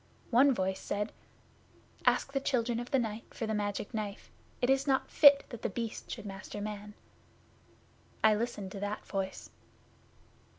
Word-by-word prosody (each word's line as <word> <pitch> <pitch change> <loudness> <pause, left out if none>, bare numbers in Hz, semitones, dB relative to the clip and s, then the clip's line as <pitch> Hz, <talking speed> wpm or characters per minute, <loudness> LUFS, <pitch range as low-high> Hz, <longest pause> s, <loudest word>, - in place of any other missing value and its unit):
One 265 +4 +6
voice 190 -5 0
said, 205 +1 -2 1.0
"Ask 275 - +3
the 275 - +2
Children 240 -4 0
of 240 - -6
the 270 - +3
Night 225 -2 -3
for 225 - -2
the 220 - -1
Magic 205 +1 -2
Knife. 210 -2 -5 0.3
It 245 - +2
is 270 +1 +2
not 265 -1 +1
fit 280 -1 +8
that 235 -4 -8
The - - -1
Beast 230 +2 -5
should - - -6
master 195 +1 -7
man." 210 0 -6 1.3
I 220 -1 +7
listened 210 -3 -2
to 195 - -6
that 205 +1 -3
voice. 195 -1 -4
215 Hz, 160 wpm, -32 LUFS, 205-245 Hz, 1.3 s, fit